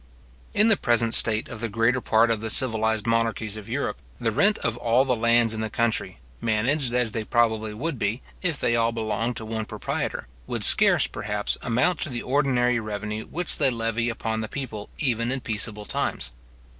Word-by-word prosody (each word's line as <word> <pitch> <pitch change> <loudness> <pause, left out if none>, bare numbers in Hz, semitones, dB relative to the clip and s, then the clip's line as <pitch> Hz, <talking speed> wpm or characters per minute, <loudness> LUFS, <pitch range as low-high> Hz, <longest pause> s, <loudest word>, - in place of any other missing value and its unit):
In 215 +2 +4
the 220 - +5
present 115 -1 +1
state 110 -1 +2
of 110 -2 -8
the 115 - -2
greater 115 +4 +1
part 115 +1 +3
of 110 -2 -1
the 110 - -3
civilized 110 -3 +3
monarchies 115 -2 0
of 110 -2 -9
Europe, - - -2 0.2
the 115 - 0
rent 205 - +3
of 115 - -2
all 120 +3 +2
the 130 -2 +1
lands 115 0 +3
in 110 - -4
the 110 - -2
country, 115 +1 -1 0.2
managed 120 +5 0
as 125 -2 +1
they 110 +1 -3
probably 110 -1 +1
would 135 +5 -4
be, 105 +5 -1 0.2
if 175 -6 -1
they 120 - +1
all 115 0 +2
belonged 115 +1 -2
to 110 - -6
one 110 0 -3
proprietor, - - -4 0.2
would - - -2
scarce, - - +6
perhaps, 105 -1 -1
amount 125 +9 +1
to - - -3
the 120 -2 -4
ordinary 125 -3 +2
revenue 105 0 -5
which 175 +1 -1
they 140 -3 +4
levy 115 0 -1
upon 110 -1 -3
the 110 - -4
people 110 -6 -6
even 120 -4 0
in 135 - -2
peaceable 105 -3 -3
times. - - -2
115 Hz, 195 wpm, -25 LUFS, 110-125 Hz, 0.2 s, scarce